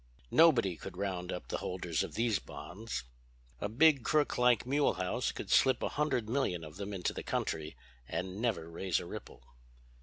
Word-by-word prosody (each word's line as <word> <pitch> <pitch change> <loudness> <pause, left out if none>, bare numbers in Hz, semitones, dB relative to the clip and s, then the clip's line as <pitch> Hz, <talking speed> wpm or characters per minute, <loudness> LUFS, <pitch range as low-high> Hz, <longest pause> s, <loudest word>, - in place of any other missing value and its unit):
Nobody 125 - +5
could 90 -2 -8
round 95 -2 -2
up 90 - -6
the - - -2
holders 90 -4 -2
of - - -4
these 115 -5 +2
bonds. 95 - -6 0.6
"A 100 - -2
big 140 +3 +5
crook 150 -2 +2
like 125 -2 +4
Mulehaus 130 -9 +1
could - - -6
slip 130 -2 +4
a - - +1
hundred 135 -7 0
million 110 -9 0
of 75 +1 -9
them 100 0 -5
into 95 -3 -1
the - - -5
country 80 0 -3 0.3
and 95 +3 -4
never 105 -10 0
raise 85 +2 -1
a - - -7
ripple." 60 - -9
100 Hz, 175 wpm, -33 LUFS, 90-125 Hz, 0.6 s, Nobody